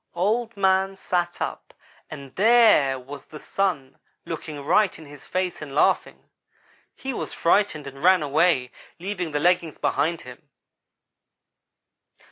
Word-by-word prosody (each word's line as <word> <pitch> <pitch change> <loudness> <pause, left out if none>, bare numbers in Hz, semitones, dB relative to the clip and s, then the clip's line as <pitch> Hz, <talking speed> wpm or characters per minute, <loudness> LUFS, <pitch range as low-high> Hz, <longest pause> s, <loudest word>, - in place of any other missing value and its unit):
Old 220 +5 0
man 190 0 +2
sat 175 -2 -2
up - - -7 0.3
and 140 -4 -10
there 215 - +5
was 135 +2 -10
the 155 - -10
Sun 160 -6 -2 0.3
looking 155 -3 -6
right 185 +4 +3
in 160 - -12
his 145 0 -14
face 185 -2 -2
and 140 -2 -8
laughing. - - +1 0.7
He 265 0 -5
was - - -5
frightened 170 -4 +1
and 135 0 -10
ran 185 -2 +5
away, 145 -3 +2 0.3
leaving 180 -2 -4
the 145 - -1
leggings 170 -1 +1
behind 165 +2 0
him. 125 -1 -13
170 Hz, 130 wpm, -24 LUFS, 145-190 Hz, 0.7 s, there